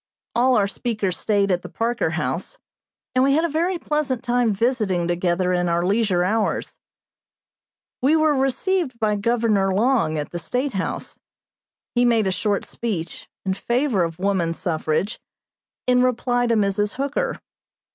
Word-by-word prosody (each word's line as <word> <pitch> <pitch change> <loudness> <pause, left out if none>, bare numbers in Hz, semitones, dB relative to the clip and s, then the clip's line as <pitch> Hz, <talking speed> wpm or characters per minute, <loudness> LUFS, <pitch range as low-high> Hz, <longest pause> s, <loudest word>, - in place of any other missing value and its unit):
All 250 +2 +3
our 200 -3 +3
speakers 205 -3 -2
stayed 200 +2 +1
at 180 -1 +1
the - - -9
Parker 235 +1 -1
House, - - -3 0.6
and 255 0 +3
we 275 +1 +4
had 320 +2 +2
a - - -1
very 340 +4 0
pleasant 300 -7 -1
time 245 -2 +2
visiting 205 -5 0
together 175 +1 +1
in 175 -1 +1
our 170 +1 +1
leisure 195 -3 +2
hours. 215 +4 -1 1.2
We 280 +5 +4
were 310 -1 +3
received 270 +2 0
by 215 -2 +1
Governor 210 -2 +1
Long, 225 -8 +2
at 150 - -4
the 175 - -4
State 250 - -2
House. 190 -2 -4 0.7
He 245 - +3
made 230 -3 +3
a 190 - +1
short 200 +2 0
speech, 185 -8 -5 0.2
in 190 - +1
favor 240 -1 0
of 165 -1 -3
woman 185 -3 0
suffrage, 165 +4 -1 0.7
in 250 0 +4
reply 245 -1 +1
to 230 - +2
Mrs. 205 0 +1
Hooker. 280 +1 -2
220 Hz, 155 wpm, -22 LUFS, 190-255 Hz, 1.2 s, we